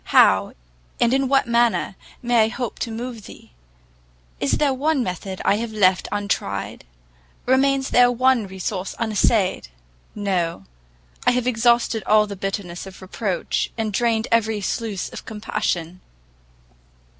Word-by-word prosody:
how, - - +4 0.5
and 240 +1 +3
in 270 0 +2
what 270 -1 +2
manner, 235 -4 +2 0.3
may 240 -2 +4
I - - 0
hope 240 +1 -5
to 235 - -2
move 230 -1 -6
thee? - - -14 0.9
Is 140 - 0
there 285 -3 +2
one 280 0 +1
method 185 -1 -5
I 205 - +3
have 230 0 -4
left 190 -4 +2
untried? 200 - -3 0.6
remains 270 +1 +2
there 245 0 +6
one 250 -3 +2
resource 190 0 -4
unessayed? 215 -3 +1 0.5
No! 180 - -1 0.6
I - - +9
have 250 -1 0
exhausted 235 -1 +2
all 215 0 +5
the 205 -1 -7
bitterness 195 -2 -4
of 190 - -11
reproach, 190 0 -2
and 220 -2 -2
drained 225 0 +1
every 220 -2 +2
sluice 205 0 -3
of - - -9
compassion! 185 -5 -3
220 Hz, 135 wpm, -22 LUFS, 195-240 Hz, 0.9 s, I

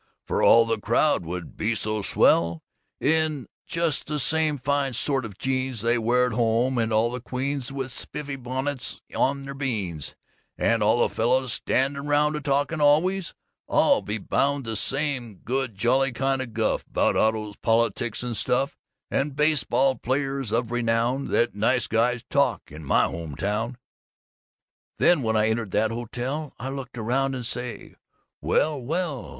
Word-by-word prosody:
For - - -1
all 115 0 +7
the 115 -1 -1
crowd 115 - +2
would 90 0 -6
be 115 +2 -1
so 110 0 -2
swell, 85 -3 +3 0.4
in 155 -2 +1 0.2
just 165 -3 0
the 150 0 -2
same 155 +1 +2
fine 140 0 0
sort 135 +1 +1
of 100 -4 -9
jeans 130 -3 -1
they 115 +1 +2
wear 120 +2 +3
at 125 - -2
home, 120 +3 +1
and 115 0 0
all 110 +2 +2
the 125 0 -5
queens 130 +1 -3
with 135 -1 -4
spiffy 145 +1 -5
bonnets 130 +1 -4 0.2
on 140 +1 +1
their 140 0 -6
beans, 105 - -4 0.4
and 115 -1 +2
all 110 +3 +3
the - - -14
fellows 125 +2 +1
standing 140 +2 0
round 150 +1 +2
a 150 - -3
talkin' 145 +2 0
always, 165 +6 +2 0.3
I'll - - +4
be 105 +2 -3
bound, 140 +6 0
the 110 0 -3
same 135 -4 0
good 125 +2 -3
jolly 130 +6 +2
kind 135 +2 0
of 120 -4 -7
guff, - - 0
'bout - - +1
autos, 110 -2 0
politics 115 0 0
and 120 -1 -3
stuff 135 +6 0 0.3
and 140 0 -1
baseball 150 -3 +2
players 135 -2 -2
of 115 0 0
renown 120 +2 0
that 120 0 +1
Nice 115 +5 +1
Guys 120 +2 +1
talk 140 - 0
in 75 +2 -9
my 70 - +3
home 80 -3 -5
town!_ 110 - -2 1.2
_Then 175 -4 +5
when 110 -2 +1
I 110 +1 +3
entered 110 -1 -1
that 110 +1 +2
hotel, 125 +6 -4
I'd 130 - -5
look 135 -2 -6
around 135 +4 0
and 125 -2 -5
say, 125 0 -5 0.5
"Well, 150 -3 +1
well!" 155 +1 -3
125 Hz, 165 wpm, -25 LUFS, 115-140 Hz, 1.2 s, all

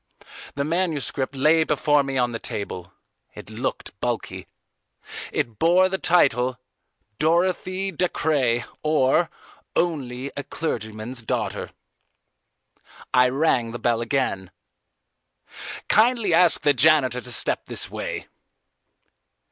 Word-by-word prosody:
The 140 - -1
manuscript 150 -5 -1
lay 155 +4 +4
before 150 -1 +2
me 135 -1 -3
on 125 -1 +1
the 115 - -4
table. 95 -5 -5 0.4
It - - -10
looked - - -4
bulky. - - -3 0.8
It 115 -3 -3
bore 180 +3 +4
the 190 0 -2
title 130 -8 +2 0.6
Dorothy 185 +4 +1
Dacres, 145 -8 0 0.2
or, 155 +1 +2 0.5
Only 140 -6 -1
a 145 - -4
Clergyman's 115 -5 -4
Daughter. 110 - -3 1.4
I 125 0 +5
rang 130 -4 +1
the - - -4
bell 120 -1 0
again. 115 -7 -1 1.4
"Kindly 225 -4 +3
ask 170 -2 +4
the 145 - +4
janitor 130 -3 +4
to 125 - -5
step - - +1
this - - -2
way." - - -5
140 Hz, 110 wpm, -23 LUFS, 125-165 Hz, 1.4 s, I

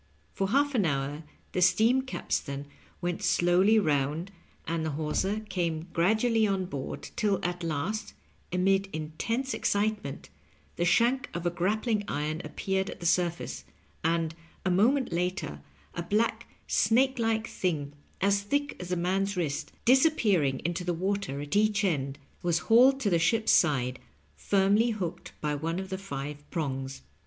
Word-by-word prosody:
For 195 - 0
half 285 +5 +2
an 230 -6 +2
hour 145 0 -2 0.3
the 180 - -1
steam 220 +9 +4
capstan 140 - -3 0.4
went 175 -1 -2
slowly 180 +5 +4
round, 155 0 0 0.4
and 165 0 -1
the 160 - -1
hawser 190 +7 -1
came 175 -5 -3
gradually 220 +5 +3
on 195 -2 0
board, 140 -6 -6
till 205 -4 +1
at 180 0 -2
last, 165 +7 -3 0.4
amid 195 +2 +2
intense 220 - -2
excitement, 210 - -1 0.5
the 175 - 0
shank 250 +9 +3
of 170 0 -4
a 175 - +2
grappling 210 +5 0
iron 155 +1 -2
appeared 190 0 -2
at - - -8
the 170 - -7
surface, 170 - 0 0.4
and, 165 0 +1 0.3
a 185 - +2
moment 245 +9 +3
later, 175 - -2 0.3
a - - -3
black, 220 +5 0 0.2
snake 255 +5 +3
like 225 -1 +1
thing 150 -9 -2 0.3
as 200 +1 +3
thick 285 +8 -1
as 180 0 -6
a - - +2
man's 190 +3 0
wrist, 150 -5 -2
disappearing 225 - +3
into 175 +1 -1
the 175 -1 -1
water 190 -5 -2
at 145 +6 -4
each 210 0 +3
end, 140 -7 0 0.2
was 170 -2 +1 0.2
hauled 265 +3 +7
to 205 - +1
the 170 - +3
ship's 215 +7 +2
side, 130 -6 +3 0.4
firmly 200 +4 +3
hooked 190 -7 -4
by 150 -1 0
one 165 +4 -2
of 190 0 -5
the 190 - -3
five 145 -5 -6
prongs. 135 - -3
180 Hz, 150 wpm, -29 LUFS, 160-215 Hz, 0.5 s, hauled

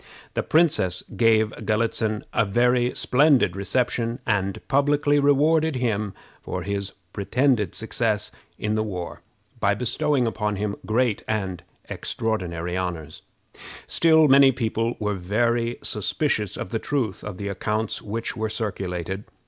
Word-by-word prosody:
The - - 0
princess 150 - +2
gave 110 -2 +3
Galitzin 110 -1 0
a - - +3
very 120 +4 +2
splendid 135 - +3
reception, 120 +3 0
and 100 -3 0
publicly 145 +1 +3
rewarded 150 +2 +3
him 110 -5 -1 0.3
for 90 - -4
his 100 0 -3 0.2
pretended 110 - +1
success 110 -1 -1 0.3
in 105 0 -1
the 110 - +1
war 90 -5 -5 0.4
by 100 0 +2
bestowing 130 +3 0
upon 105 -2 -1
him 100 +1 -2
great 115 0 +1
and 95 -5 -2 0.3
extraordinary 90 -6 -3
honors. 85 -4 -4 0.6
Still 160 -2 +4
many 135 0 +7
people 115 -1 -1
were 105 -1 -1
very 115 +5 0
suspicious 105 - -1
of - - -5
the 115 - -1
truth 125 -9 -2
of 100 -3 -6
the 100 - -4
accounts 105 +2 -2
which 115 +4 -4
were 110 -1 -2
circulated. 95 -3 -3
110 Hz, 130 wpm, -24 LUFS, 100-125 Hz, 0.6 s, many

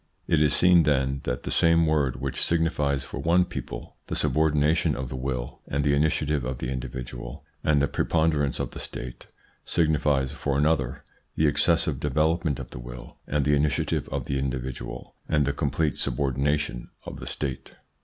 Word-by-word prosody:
It 80 - +2
is 75 -1 +3
seen, 90 -1 +6
then, 70 -3 +1
that 60 0 -2
the - - -4
same 85 0 +4
word 75 -5 +1
which 65 0 -3
signifies 75 -4 +1
for - - -7
one 85 +2 +3
people - - -7
the - - -3
subordination 75 +1 +2
of 65 -1 -4
the - - -5
will 65 -1 -4
and 70 +1 -1
the 70 0 +3
initiative 75 -1 +1
of 65 0 -3
the 60 +1 -4
individual 60 -1 -6 0.2
and 75 -2 +3
the 70 - +2
preponderance 75 -4 +1
of - - -2
the - - -8
State, 60 -1 -6 0.4
signifies 75 -4 +1
for 70 -2 -1
another 70 -4 +1 0.3
the 80 - +2
excessive 80 -1 +3
development 75 +1 +1
of - - -8
the - - -7
will - - -10
and 70 -1 0
the 75 - +3
initiative 70 -1 0
of - - -3
the 70 - -1
individual 65 -1 -4 0.2
and 75 -2 +3
the 70 - 0
complete 75 +1 0
subordination 70 -1 0 0.2
of - - -7
the - - -7
State. 70 -3 -3
70 Hz, 175 wpm, -26 LUFS, 65-75 Hz, 0.4 s, seen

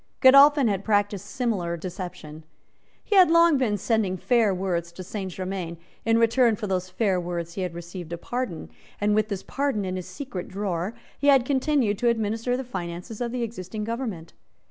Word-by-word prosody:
Godolphin 275 +1 +7
had 200 -2 -1
practised 205 -2 0
similar 205 -10 -2
deception. 170 -3 -7 0.6
He 420 - -1
had 370 -3 +7
long 335 -3 +5
been 215 -5 +1
sending 205 -3 0
fair 230 +1 +3
words 180 -2 -2
to 185 - -8
Saint 190 0 -5
Germains; 185 -2 -4 0.3
in 225 0 +4
return 230 0 +4
for 210 - -5
those 185 -2 -2
fair 185 -1 0
words 170 -1 -4
he 190 - -4
had 180 -2 -3
received 175 0 -8
a 170 - -3
pardon; 175 - -4 0.3
and, 210 0 +2
with 215 0 +2
this 200 -2 -4
pardon 275 -8 -1
in 185 0 -3
his 180 - -6
secret 250 -11 -6
drawer, 190 +1 -3 0.2
he 285 - 0
had 270 -3 +6
continued 265 -6 +1
to 245 - +1
administer 225 +2 0
the 265 - -3
finances 180 -1 -6
of 240 -1 -1
the 245 -1 -2
existing 215 -2 -5
government. 225 -8 -4
205 Hz, 185 wpm, -25 LUFS, 180-240 Hz, 0.6 s, Godolphin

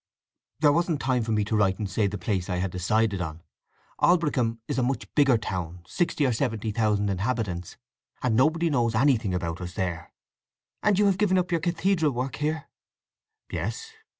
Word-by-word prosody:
"There 150 -2 +6
wasn't 170 -2 +1
time 130 -2 +1
for 115 0 -2
me 105 -1 +1
to 110 - -1
write 100 -3 +2
and 105 - -3
say 100 +1 +1
the 105 +1 -4
place 95 -2 -2
I 90 - 0
had 90 +1 -1
decided 100 +2 +1
on. 80 -1 -5 0.6
Aldbrickham 145 -10 +2
is - - -1
a - - +2
much 130 +2 -1
bigger 140 -5 +4
town—sixty 90 - -2
or 125 - +2
seventy 115 -3 -1
thousand 105 -2 +1
inhabitants—and 110 +3 -3
nobody 160 +6 +3
knows 120 -4 +1
anything 110 -6 +2
about 85 -1 -3
us 90 0 -6
there." 85 -5 -3 0.7
"And 210 -2 +3
you 205 - +4
have 195 -1 +2
given 195 -3 +3
up 180 0 0
your 170 -2 +1
cathedral 170 -2 +1
work 125 +2 -3
here?" 155 +1 -2 0.8
"Yes. 450 0 -4
115 Hz, 175 wpm, -26 LUFS, 100-150 Hz, 0.8 s, There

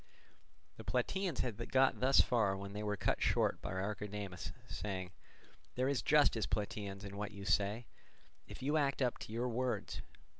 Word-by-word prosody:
The - - -8
Plataeans 190 -7 0
had 120 -2 -4
got 135 0 +4
thus 130 +2 +6
far 105 -5 +2
when 100 0 -6
they 105 - -4
were 105 -1 -1
cut - - 0
short - - +2
by - - -4
Archidamus 100 -1 -4 0.2
saying: 95 -3 -4 0.6
"There 130 +1 +1
is 140 -4 +1
justice, 145 -7 +4
Plataeans, 100 -1 -3
in 100 0 -7
what 105 0 -2
you 100 -1 -9
say, 105 +3 +1 0.6
if - - -9
you 145 +3 +2
act 140 -2 +2
up 125 - 0
to - - -8
your 120 +3 -1
words. 125 +1 -2
105 Hz, 165 wpm, -36 LUFS, 100-130 Hz, 0.6 s, thus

